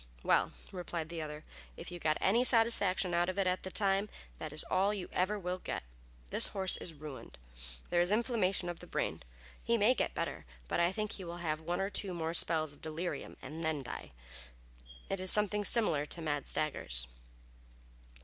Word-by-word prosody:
"Well," - - +3 0.2
replied 175 -3 -4
the 170 -1 -4
other, 150 0 -6 0.3
"if 175 - -8
you 175 - -6
got 155 -2 +1
any 230 +6 +4
satisfaction 225 -7 +4
out 175 +1 +2
of 185 - -3
it 195 - +2
at 185 0 +1
the 190 - -5
time 195 +1 +2 0.3
it 155 - -5
is 150 - -1
all 195 +3 +1
you 190 -3 -5
ever 190 +4 +1
will 180 -1 -3
get. - - -4 0.5
This - - +6
horse 190 -2 +4
is 165 - -7
ruined. 145 -2 -9 0.5
There 175 - +4
is 175 - +3
inflammation 210 -5 +1
of 175 -1 -4
the - - -10
brain. - - -2 0.4
He 235 +1 +2
may 220 +4 +5
get - - -1
better, - - -3 0.2
but - - 0
I 170 +1 +4
think 210 +2 -3
he 190 - -5
will 170 0 -6
have 155 -3 -2
one 175 +3 -2
or 195 +1 -1
two 190 -4 -1
more 165 -1 -2
spells 155 -3 +1
of 145 - -18
delirium 160 -1 -4
and 155 +5 -6
then 155 -3 -1
die. - - -6 1.0
It 195 - -2
is 185 0 +2
something 210 0 +3
similar 180 -10 +3
to 170 - -6
mad 145 -3 -1
staggers." 60 - +1
180 Hz, 195 wpm, -33 LUFS, 160-195 Hz, 1.0 s, This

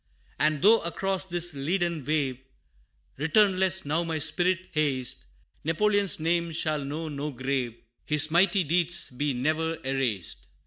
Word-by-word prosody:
And 155 +1 +1
though 225 +3 +7
across 190 +2 -1
this 175 -1 0
leaden 170 +2 -1
wave, 140 -3 0 0.8
Returnless 190 +3 +3
now 155 +4 0
my 165 -1 -2
spirit 175 +4 0
haste, 130 - -1 0.4
Napoleon's 200 +5 +1
name 170 +1 0
shall 155 -2 -1
know 155 +4 -4
no 145 0 -4
grave, 130 -3 -2 0.3
His 150 +1 +2
mighty 185 +3 +4
deeds 170 0 +1
be 140 +3 -1
ne'er 160 +5 -1
erased. 130 -10 -2
160 Hz, 130 wpm, -27 LUFS, 140-175 Hz, 0.8 s, though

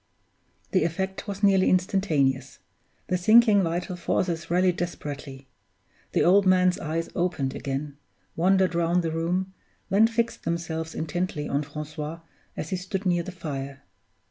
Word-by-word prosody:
The 185 - +3
effect 190 +4 -3
was 200 0 -5
nearly 195 -2 +5
instantaneous; 150 -9 +1 0.5
the 180 - -1
sinking 215 +1 +6
vital 175 +1 -2
forces 170 -1 -1
rallied 180 +1 +2
desperately. 145 -5 -6 0.7
The - - +3
old 190 +2 +5
man's 185 -1 +4
eyes 165 +1 -3
opened 170 -7 -1
again, 140 +1 -4 0.4
wandered 190 +2 +3
round 170 +1 +1
the 165 - -1
room, 180 +4 -1 0.4
then 210 +3 +6
fixed 235 0 -1
themselves 165 -1 -3
intently 160 -2 -2
on 140 - 0
Francois 150 +2 -6 0.4
as 155 - -5
he 185 - 0
stood 190 +2 -4
near 175 -2 +2
the 180 - -7
fire. 140 -6 -6
175 Hz, 140 wpm, -26 LUFS, 155-185 Hz, 0.7 s, sinking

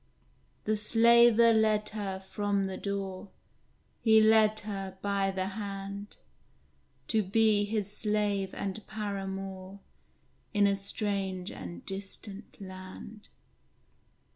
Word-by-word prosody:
The 215 - +1
Slaver 230 +1 +6
led 215 -1 +2
her 200 -3 -4
from 200 +1 -1
the 190 -1 -4
door, 195 -1 -4 0.7
He 220 -1 +6
led 215 0 +5
her 195 -2 -5
by 200 0 0
the 190 0 -2
hand, 200 0 -6 0.9
To 220 -1 +3
be 210 +1 +3
his 205 -1 -2
slave 205 -3 0
and 200 +2 -4
paramour 195 -2 -5 0.8
In 205 0 +5
a 200 0 +3
strange 195 -2 -2
and 85 -2 -8
distant 195 +2 -6
land! 185 +2 -10
200 Hz, 105 wpm, -30 LUFS, 195-215 Hz, 0.9 s, Slaver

